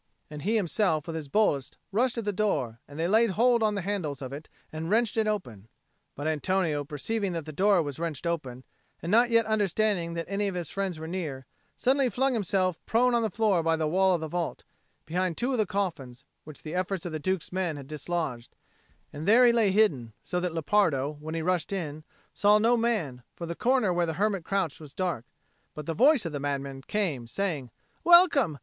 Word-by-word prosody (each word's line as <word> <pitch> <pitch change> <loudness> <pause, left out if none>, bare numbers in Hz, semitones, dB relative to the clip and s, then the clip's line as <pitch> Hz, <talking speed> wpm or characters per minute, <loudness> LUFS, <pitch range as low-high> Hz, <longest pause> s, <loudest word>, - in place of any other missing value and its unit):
and 150 -1 -7
himself 195 -5 +1
with 165 - -5
his 155 -3 -5
boldest 145 -6 +1
rushed 245 +4 +1
at 230 - -3
the 205 - 0
door, 145 - -1
and 145 +2 -10
they 165 - +1
laid 220 +4 +4
hold 235 +4 +3
on 215 -1 +2
the 200 - -3
handles 180 -8 -3
of 130 -1 -6
it 150 +2 -8 0.2
and 160 +1 -4
wrenched 225 +1 +2
it 220 -1 +1
open. 120 - -3 0.5
But 145 - -6
Antonio, 160 0 0
perceiving 185 +7 -3
that 165 -3 -4
the 155 - -7
door 195 +1 +3
was 145 -1 -6
wrenched 165 -2 -4
open, 135 -7 -3 0.4
and 170 - -2
not 240 +3 +5
yet 230 -1 +4
understanding 205 -4 0
that 165 0 -3
any 200 +1 -1
of 195 - -3
his 175 -4 -4
friends 195 -4 -2
were 160 +1 -7
near, 155 -7 -4 0.3
suddenly 265 0 +2
flung 265 +2 +1
himself 190 -5 0
prone 245 +2 +3
on 235 - +3
the 220 - 0
floor 210 -3 +2
by 165 0 +2
the 160 -1 -1
wall 190 +3 +3
of 170 - -3
the 160 - -3
vault, 175 +1 -3 0.4
behind 180 +1 -1
two 250 +3 0
of 255 - 0
the 215 - +2
coffins 145 -11 -3 0.2
which 155 -1 -11
the 155 - -6
efforts 185 0 -2
of 175 - -4
the 155 - -3
Duke's 185 +2 -2
men 180 -4 -2
had 140 - -8
dislodged; 150 -4 -4 0.6
and 150 +4 -6
there 240 +4 +7
he 240 - +6
lay 225 -4 +3
hidden; 160 - +2
so 180 - -2
that 180 -2 -3
Lepardo, 155 -5 +1
when 160 +2 -6
he 165 - -2
rushed 180 0 0
in, 155 -6 -4 0.3
saw 210 +1 +4
no 230 +3 +3
man, 210 - -1
for 170 - -6
the 170 - -4
corner 245 -1 +2
where 175 -1 +1
the 160 - -1
hermit 195 +1 0
crouched 190 -5 -1
was 150 -3 -12
dark; 175 -11 -2 0.5
but 150 - -6
the 165 - -2
voice 265 - +4
of 165 - -3
the 145 - -4
madman 140 -1 -3
came, 150 - -2
saying, 155 -4 -2 0.3
"Welcome! 335 - +6
180 Hz, 215 wpm, -28 LUFS, 155-210 Hz, 0.6 s, there